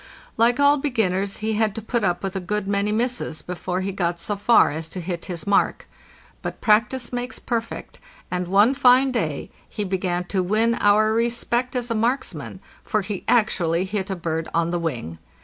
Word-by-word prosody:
Like 235 Hz, +3 st, +3 dB
all 285 Hz, +1 st, +5 dB
be 290 Hz, +1 st, -1 dB
ginners, 195 Hz, -4 st, 0 dB
he 220 Hz, +1 st, 0 dB
had 215 Hz, -1 st, +1 dB
to 225 Hz, -, -4 dB
put 235 Hz, 0 st, -1 dB
up 180 Hz, -1 st, 0 dB
with 195 Hz, 0 st, -3 dB
a -, -, 0 dB
good 195 Hz, +2 st, -3 dB
many 200 Hz, +1 st, +1 dB
misses 230 Hz, -7 st, -2 dB
before 180 Hz, +1 st, -3 dB
he 195 Hz, +1 st, -2 dB
got 175 Hz, -2 st, -1 dB
so 205 Hz, +4 st, -2 dB
far 215 Hz, +4 st, +4 dB
as 160 Hz, +2 st, -5 dB
to 185 Hz, -, -6 dB
hit 175 Hz, -1 st, -4 dB
his 170 Hz, -4 st, -6 dB
mark. 200 Hz, -, +1 dB, 0.5 s
But -, -, -5 dB
practice 235 Hz, +3 st, +2 dB
makes 245 Hz, +1 st, -3 dB
perfect; 230 Hz, -2 st, -4 dB, 0.3 s
and 180 Hz, -1 st, -2 dB
one 205 Hz, +7 st, +4 dB
fine 265 Hz, 0 st, +5 dB
day 160 Hz, -, -2 dB, 0.2 s
he 210 Hz, -, -3 dB
began 185 Hz, -2 st, -1 dB
to 190 Hz, -, +1 dB
win 215 Hz, +5 st, +2 dB
our 215 Hz, +1 st, +4 dB
respect 235 Hz, +2 st, 0 dB
as 245 Hz, -1 st, -1 dB
a -, -, +3 dB
marksman, 235 Hz, +5 st, -2 dB, 0.2 s
for 215 Hz, -3 st, 0 dB
he 195 Hz, -1 st, -4 dB
actually 185 Hz, -7 st, +2 dB
hit 195 Hz, 0 st, -3 dB
a 190 Hz, -, -1 dB
bird 165 Hz, -2 st, -3 dB
on 170 Hz, 0 st, +1 dB
the 175 Hz, -, -1 dB
wing. 120 Hz, -, -4 dB
205 Hz, 195 wpm, -23 LUFS, 180-235 Hz, 0.5 s, all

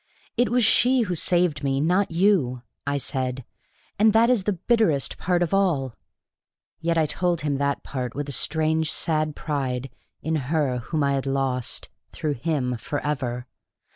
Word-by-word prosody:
"It 245 Hz, +1 st, +2 dB
was 245 Hz, -1 st, +3 dB
she 250 Hz, +4 st, +4 dB
who 190 Hz, -6 st, -1 dB
saved 175 Hz, -3 st, +1 dB
me, 135 Hz, -1 st, +1 dB
not 180 Hz, +7 st, +2 dB
you," 165 Hz, -9 st, +2 dB, 0.2 s
I 140 Hz, 0 st, +1 dB
said. 130 Hz, -2 st, -3 dB, 0.5 s
"And 215 Hz, 0 st, +5 dB
that 230 Hz, +2 st, +5 dB
is 215 Hz, -7 st, +1 dB
the 210 Hz, -, +1 dB
bitterest 190 Hz, -, +1 dB
part 175 Hz, 0 st, +1 dB
of 170 Hz, -, -3 dB
all!" 160 Hz, -11 st, +1 dB, 0.8 s
Yet 165 Hz, 0 st, 0 dB
I 160 Hz, -, +4 dB
told 170 Hz, +5 st, 0 dB
him 145 Hz, -2 st, -1 dB
that 140 Hz, 0 st, -1 dB
part 125 Hz, -3 st, -4 dB
with 145 Hz, +1 st, -3 dB
a -, -, -4 dB
strange 160 Hz, +2 st, +1 dB
sad 155 Hz, -3 st, 0 dB
pride 135 Hz, -4 st, -3 dB, 0.3 s
in 160 Hz, 0 st, 0 dB
her 145 Hz, -6 st, +1 dB
whom 150 Hz, +5 st, -2 dB
I 140 Hz, 0 st, +2 dB
had 135 Hz, 0 st, -1 dB
lost 135 Hz, -2 st, -1 dB, 0.2 s
through 150 Hz, -2 st, -2 dB
him 125 Hz, -2 st, -1 dB
forever. 130 Hz, -2 st, -3 dB
150 Hz, 165 wpm, -24 LUFS, 135-175 Hz, 0.8 s, And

